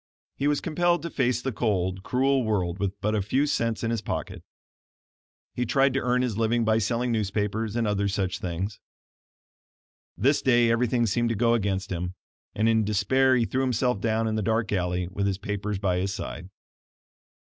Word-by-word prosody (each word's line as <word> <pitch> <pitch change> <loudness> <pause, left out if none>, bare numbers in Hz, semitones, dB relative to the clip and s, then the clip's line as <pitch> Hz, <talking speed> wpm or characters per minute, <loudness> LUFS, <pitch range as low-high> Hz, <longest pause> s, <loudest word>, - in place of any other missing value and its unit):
He 140 - -1
was 145 -1 +1
compelled 175 +1 +1
to 170 - -4
face 125 -2 0
the 135 - -1
cold, 95 -5 -1
cruel 135 +5 +1
world 95 -5 -1
with 100 +1 -2
but 105 +2 0
a 105 - +1
few 130 +9 +1
cents 115 -6 -1
in 115 - 0
his 115 -3 -1
pocket. - - -5 1.1
He 125 - -1
tried 135 +2 +2
to 135 - +1
earn 125 0 +1
his 115 -4 -2
living 115 +1 +1
by 110 0 +3
selling 120 +3 0
newspapers 105 0 -1
and 120 -1 +1
other 100 -1 0
such 95 -2 -2
things. 95 +4 -4 1.4
This 140 +7 +2
day 120 -2 +4
everything 120 0 +2
seemed 115 +3 +1
to 115 - 0
go 115 +2 +3
against 100 -3 -1
him, 90 +1 -3 0.4
and 110 +2 +2
in 110 -1 +3
despair 110 +6 +2
he 120 -2 +2
threw 130 +3 -1
himself 125 -4 0
down 115 0 +1
in 110 - -1
the 110 - 0
dark 110 +1 0
alley, 90 -2 -1
with 100 +2 -2
his 95 -2 -1
papers 105 0 -3
by 95 -2 0
his 95 +1 -1
side. 90 -2 -6
110 Hz, 190 wpm, -26 LUFS, 100-125 Hz, 1.4 s, day